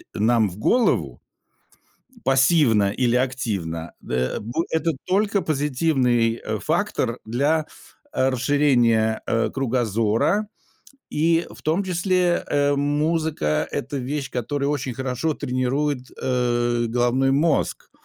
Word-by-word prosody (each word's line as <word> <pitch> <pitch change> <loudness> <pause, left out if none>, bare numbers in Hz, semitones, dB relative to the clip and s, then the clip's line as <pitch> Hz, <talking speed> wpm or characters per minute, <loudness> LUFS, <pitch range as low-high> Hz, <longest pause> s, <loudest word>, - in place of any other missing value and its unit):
нам 110 0 +2
в 90 - -11
голову 240 - +1 1.0
пассивно 130 -7 +3
или 120 +1 +1
активно, 100 -11 -2
дэ 65 0 -2
э, - - -10
б 110 +3 -7 0.2
это 165 +1 +1
только 200 +2 +1
позитивный, 130 -5 +1
э, 110 - -2
фактор 155 - -1
для, 145 +7 +1 0.5
э, 130 - +2
расширения, 120 -5 +2
э, 115 0 0
кругозора, 120 - 0 0.7
и 165 +2 +2
в - - -13
том 165 +6 +1
числе, 180 -1 +1
э, 145 0 +2
музыка- 145 - 0
это 140 +3 -3
вещь, 135 +1 -3
которая 140 +4 -2
очень 145 -3 -2
хорошо 130 +5 -2
тренирует, 130 0 -2
э, 120 -1 0
головной 120 +3 +1
мозг, 150 +4 0
130 Hz, 115 wpm, -23 LUFS, 120-150 Hz, 1.0 s, пассивно